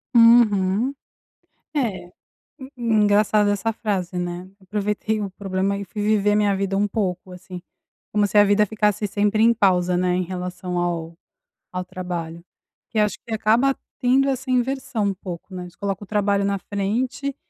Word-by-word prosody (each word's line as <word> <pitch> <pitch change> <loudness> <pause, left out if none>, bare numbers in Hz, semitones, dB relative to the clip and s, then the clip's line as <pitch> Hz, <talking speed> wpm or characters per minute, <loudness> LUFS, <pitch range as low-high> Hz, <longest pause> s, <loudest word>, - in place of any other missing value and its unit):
Uhum. 230 0 +5 0.8
É 210 -10 -2 0.5
en 265 0 -10 0.3
engraçado 205 0 +3
essa 205 +3 0
frase, 195 -5 -3
né, 175 +1 -4
eu - - -22
aproveitei 210 +2 -2
o 200 - -3
problema 195 0 -2
e 200 - -5
fui 210 +3 -6
viver 210 -1 +2
a - - +3
minha 205 -1 +2
vida 195 0 -1
um 205 +1 +2
pouco, 185 -3 -3
assim, 180 0 -9 0.5
como 210 0 +2
se 200 - -10
a 205 - +9
vida 205 +1 +4
ficasse 210 0 0
sempre 210 +2 +1
em 235 - +6
pausa, 180 -4 +2
né, 180 0 +1
em 185 - 0
relação 180 0 -5
ao 170 -1 -2 0.6
ao 180 0 -3
trabalho, 175 -2 -6 0.5
que 220 - -3
acho 210 -1 +1
que 230 - -7
acaba 230 +6 +2 0.2
tendo 265 +2 +3
essa 265 -1 -2
inversão 250 -3 0
um 195 - -1
pouco, 180 0 -8
né, 180 -1 -6
você - - -19
coloca 200 -1 -3
o - - -16
trabalho 200 -1 +1
na 200 0 0
frente 240 +9 -2
200 Hz, 170 wpm, -22 LUFS, 185-215 Hz, 0.8 s, a